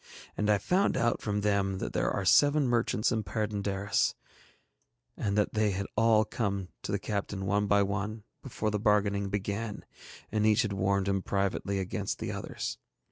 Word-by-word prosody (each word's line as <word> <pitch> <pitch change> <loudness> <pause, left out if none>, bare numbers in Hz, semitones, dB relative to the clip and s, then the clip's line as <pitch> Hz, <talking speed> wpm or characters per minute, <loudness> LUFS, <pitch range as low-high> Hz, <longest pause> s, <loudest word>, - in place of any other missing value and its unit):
And 105 0 0
I 105 - +5
found 185 - +1
out 120 0 +1
from 105 -1 -1
them 100 -2 +1
that - - -4
there - - +1
are 100 - -2
seven 145 +7 +5
merchants 120 -2 +1
in 110 -2 0
Perd├│ndaris, 100 0 -1 1.0
and 100 -1 -1
that 105 - +1
they 110 -1 +2
had 100 +1 -2
all 110 -1 +4
come 100 -6 -2
to - - -5
the 100 - +1
captain 100 -2 -3
one 100 +2 +1
by 100 0 +4
one 100 +2 -3 0.2
before 110 -5 -3
the 105 - -1
bargaining 100 -2 +2
began, 105 +2 -3 0.5
and 105 0 +1
each 110 +2 +4
had 105 -3 -2
warned 100 0 +1
him 95 -1 +1
privately 100 +1 -1
against 95 +1 -3
the - - -4
others. - - -5
105 Hz, 175 wpm, -30 LUFS, 100-110 Hz, 1.0 s, I